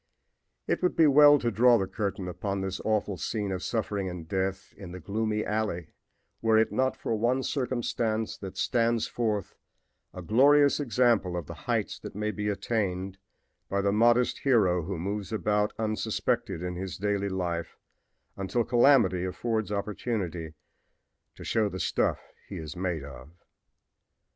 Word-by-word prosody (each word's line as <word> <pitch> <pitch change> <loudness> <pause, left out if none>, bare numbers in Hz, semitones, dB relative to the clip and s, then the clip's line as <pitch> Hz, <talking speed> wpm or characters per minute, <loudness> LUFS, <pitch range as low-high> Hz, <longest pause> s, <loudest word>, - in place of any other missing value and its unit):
It - - -1
would 180 - +1
be 165 - +5
well 145 0 +7
to 120 -4 -1
draw 120 +3 +5
the 95 - 0
curtain 100 -1 -3
upon 95 +3 -3
this 95 -1 -3
awful 105 -3 0
scene 105 -1 -2
of 95 -1 -3
suffering 105 -4 -2
and 90 -3 -7
death 95 +1 -2
in 90 -3 -10
the 90 - -7
gloomy 105 +2 -2
alley 105 -7 -2 0.5
were 110 -1 +4
it 110 - +3
not 130 0 0
for - - -2
one 120 +4 +1
circumstance 120 -5 -1
that 95 -2 -8
stands 115 -1 +1
forth 110 -4 -2 0.6
a 90 - -8
glorious 140 - +5
example 115 -9 +2
of 85 - -4
the - - -8 0.2
heights - - 0
that - - -9
may 105 +1 -1
be 105 -1 -3
attained 95 -3 -2 0.5
by 100 - 0
the 100 0 +1
modest 120 +3 +3
hero 100 -10 +3
who 90 +3 -4
moves 100 +4 -4
about 105 -1 +1
unsuspected 110 -5 -1
in 90 0 -3
his 90 -1 -5
daily 100 0 -1
life 85 -3 -3 0.6
until 100 +5 -1
calamity 120 -6 +4
affords 110 +3 -2
opportunity 100 -6 -3 0.8
to - - -10
show 110 -2 +1
the 95 - -6
stuff 80 - +1 0.3
he - - -6
is 80 -1 -7
made 90 -4 -2
of. 70 0 -10
105 Hz, 155 wpm, -28 LUFS, 95-115 Hz, 0.8 s, well